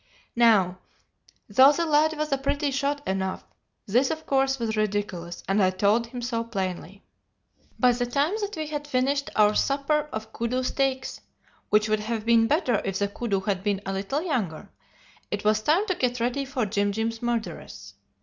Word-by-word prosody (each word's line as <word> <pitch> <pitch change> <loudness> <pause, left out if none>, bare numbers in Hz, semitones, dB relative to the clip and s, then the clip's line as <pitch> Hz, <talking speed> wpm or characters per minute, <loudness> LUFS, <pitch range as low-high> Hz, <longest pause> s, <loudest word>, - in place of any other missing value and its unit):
Now, 205 -6 +4 0.7
though 260 +7 +7
the 335 +3 0
lad 310 0 +3
was 305 0 -2
a 275 - +2
pretty 285 +1 -1
shot 280 +1 -2
enough, 190 0 -2 0.4
this 245 +6 +2
of 315 0 -4
course 270 0 +1
was 225 -3 -2
ridiculous, 205 -5 -2
and 195 +2 +2
I 185 - +4
told 205 +5 +1
him 245 +1 -7
so 235 -1 -1
plainly. 195 -3 -5 0.8
"By 250 -1 +5
the 245 0 -1
time 285 +8 +1
that 410 0 -3
we 315 -1 -3
had 295 -1 -5
finished 280 +1 0
our 210 0 +5
supper 290 +4 0
of 220 0 -6
koodoo 245 +2 -1
steaks 265 0 -1 0.5
(which 210 +1 +3
would 215 0 +1
have 220 0 -3
been 230 -1 +4
better 260 - +1
if 195 - -2
the 200 - 0
koodoo 200 -2 -2
had 195 -2 -1
been 200 -2 0
a 195 - -3
little 200 +11 -2
younger), 225 - -3 0.6
it 205 0 -3
was 215 0 +2
time 325 - +2
to 375 - 0
get 250 -6 -1
ready 250 +4 -1
for 265 -3 -2
Jim 205 0 0
Jim's 225 +2 -3
murderess. 220 - -4
235 Hz, 180 wpm, -26 LUFS, 205-275 Hz, 0.8 s, though